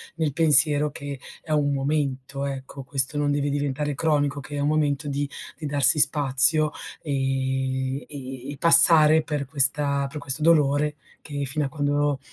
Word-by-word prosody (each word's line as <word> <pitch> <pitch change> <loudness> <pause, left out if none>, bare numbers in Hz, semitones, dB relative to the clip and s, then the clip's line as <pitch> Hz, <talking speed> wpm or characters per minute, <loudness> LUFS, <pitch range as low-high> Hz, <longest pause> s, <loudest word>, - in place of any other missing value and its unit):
nel 155 -4 -2
pensiero 150 -1 +3
che 140 -1 -7 0.2
è 155 - -9
un 145 -2 +1
momento, 140 -1 -3
ecco, 135 0 -7
questo 135 +2 -1
non 145 0 0
deve 145 0 -1
diventare 145 +1 -3
cronico, 145 -2 -1
che 145 +1 -9
è - - -3
un 145 - -1
momento 150 -1 -1
di 140 0 -3 0.3
di 155 - -8
darsi 145 0 +3
spazio 145 +2 +4 0.3
e 135 -1 -2
e 135 -1 -9
e 145 - -9
passare 160 0 +6
per 150 -3 -4
questa 140 0 0
per 150 - -8
questo 145 0 -4
dolore 150 -2 +2 0.3
che 145 -2 -6
fino 145 +2 -1
a - - -4
quando 145 -1 -1
145 Hz, 160 wpm, -23 LUFS, 135-150 Hz, 0.3 s, passare